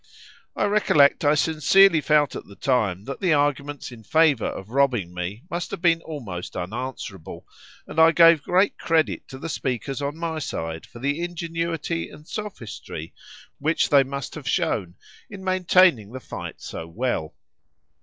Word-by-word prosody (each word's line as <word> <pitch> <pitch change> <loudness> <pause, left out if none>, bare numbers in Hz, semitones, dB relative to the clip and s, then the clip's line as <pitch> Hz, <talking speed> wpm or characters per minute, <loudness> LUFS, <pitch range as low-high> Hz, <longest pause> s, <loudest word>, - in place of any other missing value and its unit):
I - - +1
recollect 180 -8 +4
I 145 +1 +4
sincerely 160 +3 +4
felt 150 -1 +2
at - - -7
the 100 - -13
time 105 -9 0
that 135 +5 -6
the 185 -5 +2
arguments 145 -1 -1
in 120 -2 -11
favour 150 +1 +3
of 95 +3 -7
robbing 125 -10 +1
me 90 +6 -5
must 170 0 -4
have 200 - -5
been 165 -1 +4
almost 115 - -7
unanswerable, 110 -3 -6 0.4
and 160 - -4
I 160 0 +7
gave 165 -2 +6
great 185 +6 +1
credit 160 -1 0
to 130 - -9
the 155 - -6
speakers 135 -2 -3
on 145 +2 -3
my 165 -1 -3
side 80 - -5
for - - -14
the 140 +6 -2
ingenuity 165 -1 -3
and 150 +2 -15
sophistry 115 - -7 0.5
which 160 +4 +1
they 140 -1 +6
must 135 0 -5
have - - -6
shown 90 -1 -1 0.3
in 200 -2 -9
maintaining 185 - +3
the 130 - -5
fight - - -8
so 80 - -7
well. 85 -4 -3
145 Hz, 160 wpm, -24 LUFS, 120-165 Hz, 0.5 s, I